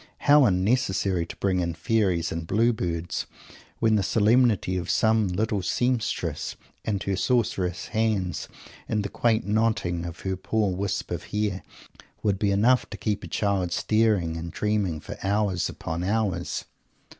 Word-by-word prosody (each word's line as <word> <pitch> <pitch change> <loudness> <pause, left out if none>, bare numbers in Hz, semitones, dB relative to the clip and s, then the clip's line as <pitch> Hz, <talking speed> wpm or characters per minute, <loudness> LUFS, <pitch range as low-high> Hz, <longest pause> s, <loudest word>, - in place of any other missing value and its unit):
How 145 -1 +7
unnecessary 95 -3 +1
to - - -8
bring 95 -2 0
in 85 -2 -1
Fairies 90 -4 +1
and 80 0 -4
Blue 115 +5 +3
Birds, 85 -4 -3 0.5
when 110 -1 +3
the - - +2
solemnity 110 -1 +3
of 90 -1 -3
some 110 -2 +3
little 100 +2 -1
seamstress 120 +5 -1 0.3
and 100 -3 -1
her 100 - -1
sorceress 95 -6 0
hands, 105 -6 0 0.4
and 105 -2 0
the 100 - -3
quaint 115 0 +1
knotting 105 -5 0
of 85 - -9
her 95 -1 -2
poor 100 0 0
wisp 100 +1 -2
of - - -4
hair, 105 -2 -2 0.6
would 100 -3 +1
be 105 - +2
enough 115 +6 +3
to - - -7
keep 105 -2 -2
a - - -6
child 100 -4 0
staring 105 -6 +1
and 85 +1 -5
dreaming 105 -6 0
for - - -8
hours 100 -3 0
upon 85 +2 -4
hours! 105 0 -1
100 Hz, 155 wpm, -26 LUFS, 90-110 Hz, 0.6 s, How